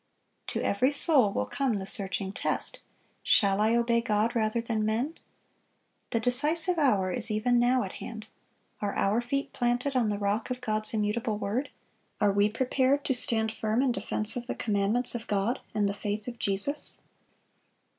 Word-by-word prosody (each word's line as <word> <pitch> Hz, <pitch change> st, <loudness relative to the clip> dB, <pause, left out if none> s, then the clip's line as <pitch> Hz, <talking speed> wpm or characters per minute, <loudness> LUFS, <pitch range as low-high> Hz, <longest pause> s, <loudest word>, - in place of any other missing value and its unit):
To -, -, -3 dB
every 250 Hz, +7 st, +1 dB
soul 285 Hz, -7 st, +4 dB
will 105 Hz, -, -2 dB
come 265 Hz, -, -2 dB
the 190 Hz, -, -5 dB
searching 195 Hz, 0 st, -1 dB
test, -, -, -2 dB, 0.4 s
Shall 200 Hz, 0 st, +2 dB
I 220 Hz, +2 st, +2 dB
obey 235 Hz, 0 st, +1 dB
God 220 Hz, 0 st, 0 dB
rather 220 Hz, 0 st, 0 dB
than 230 Hz, -2 st, -2 dB
men? 230 Hz, +8 st, -1 dB, 1.0 s
The 230 Hz, -, -1 dB
decisive 310 Hz, +9 st, 0 dB
hour 205 Hz, -11 st, +2 dB
is 240 Hz, +1 st, +1 dB
even 240 Hz, +3 st, +1 dB
now 245 Hz, +1 st, +2 dB
at 190 Hz, -, -6 dB
hand. 220 Hz, -2 st, -9 dB, 0.6 s
Are 205 Hz, -1 st, -3 dB
our 210 Hz, +4 st, +1 dB
feet 275 Hz, +3 st, -3 dB
planted 245 Hz, +3 st, -1 dB
on 235 Hz, -4 st, +1 dB
the 205 Hz, -, -2 dB
rock 205 Hz, +3 st, -2 dB
of 250 Hz, 0 st, -4 dB
God's 215 Hz, -2 st, -2 dB
immutable 215 Hz, +1 st, -1 dB
word? 230 Hz, +8 st, -3 dB, 0.5 s
Are 205 Hz, -1 st, +3 dB
we 205 Hz, +1 st, +2 dB
prepared 260 Hz, +4 st, 0 dB
to 265 Hz, -, +1 dB
stand 220 Hz, -3 st, +4 dB
firm 220 Hz, +3 st, -1 dB
in 265 Hz, -, +1 dB
defense 215 Hz, 0 st, +3 dB
of 245 Hz, 0 st, -5 dB
the -, -, -3 dB
commandments 210 Hz, +3 st, +2 dB
of 235 Hz, -2 st, -6 dB
God 205 Hz, +5 st, -1 dB, 0.2 s
and 205 Hz, -1 st, +1 dB
the 200 Hz, -, -2 dB
faith 205 Hz, +1 st, -4 dB
of 240 Hz, -1 st, -7 dB
Jesus? 200 Hz, +10 st, +1 dB
225 Hz, 175 wpm, -27 LUFS, 210-250 Hz, 1.0 s, soul